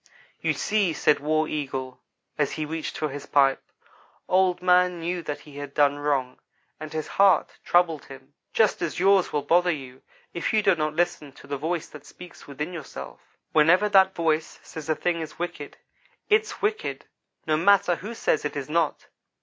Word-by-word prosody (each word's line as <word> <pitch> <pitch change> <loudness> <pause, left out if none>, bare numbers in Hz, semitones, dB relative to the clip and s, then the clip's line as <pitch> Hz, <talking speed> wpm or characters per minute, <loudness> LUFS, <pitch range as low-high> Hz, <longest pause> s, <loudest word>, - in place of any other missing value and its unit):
"You - - +1
see," 205 -6 0
said 150 - +2
War 155 +2 +1
Eagle, 130 -4 -4 0.4
as 145 -2 0
he 155 - -3
reached 160 +1 -5
for 155 -3 -1
his 145 +1 -8
pipe," 135 -2 +3 0.7
Old 185 -1 +2
man 180 -1 +3
knew 175 +2 -3
that 150 -2 -5
he 145 -2 -13
had 145 -1 -7
done 145 -1 +3
wrong, 140 -3 -1 0.4
and 155 0 -7
his 155 -1 -3
heart 195 -1 +3
troubled 170 -4 +2
him, 135 +1 -13 0.2
just 220 -2 +2
as - - -2
yours 195 0 +4
will 145 -1 -1
bother 175 +1 +3
you 130 -5 -5 0.3
if 170 - -2
you 215 -1 +3
do 195 -2 +5
not 155 -2 -2
listen 170 -4 -1
to - - -15
the 145 - -4
voice 165 +3 -3
that 150 -2 -13
speaks 180 -1 -13
within 150 +5 -5
yourselves. 70 - -8 0.3
Whenever 170 +7 +5
that 190 -1 +5
voice 160 -1 -1
says 160 -1 -9
a 155 - +2
thing 170 0 -1
is 160 - -8
wicked, 175 -4 -6 0.5
its 430 0 +1
wicked 425 +1 -2 0.4
no 155 - +2
matter 180 +1 +4
who 225 +4 -7
says 155 - 0
it 150 - -3
is 140 +1 -5
not. 165 -2 0
160 Hz, 180 wpm, -25 LUFS, 145-180 Hz, 0.7 s, do